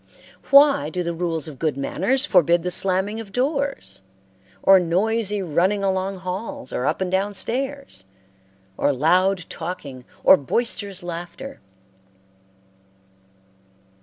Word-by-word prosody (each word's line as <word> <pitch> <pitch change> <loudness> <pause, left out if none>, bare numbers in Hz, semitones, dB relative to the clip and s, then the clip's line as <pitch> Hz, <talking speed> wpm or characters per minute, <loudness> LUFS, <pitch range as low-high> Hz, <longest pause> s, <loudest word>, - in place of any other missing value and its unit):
Why 280 - +6
do 180 +3 -3
the 170 0 -2
rules 165 -2 -2
of 145 -4 -10
good 155 -4 -1
manners 245 - 0
forbid 170 - +3
the 180 - -2
slamming 195 +4 0
of 215 -3 -8
doors, 275 - -1 0.6
or 195 -1 +7
noisy 205 +4 0
running 185 +5 +1
along 190 0 -1
halls 200 +10 -6
or 125 - -1
up 155 - -1
and 185 -1 -1
down 200 +2 0
stairs, 265 - -3 0.7
or 145 - +2
loud 180 +6 +2
talking 150 -7 -7 0.2
or 190 - +8
boisterous 200 - -2
laughter? 175 +10 -7
190 Hz, 120 wpm, -22 LUFS, 170-220 Hz, 0.7 s, or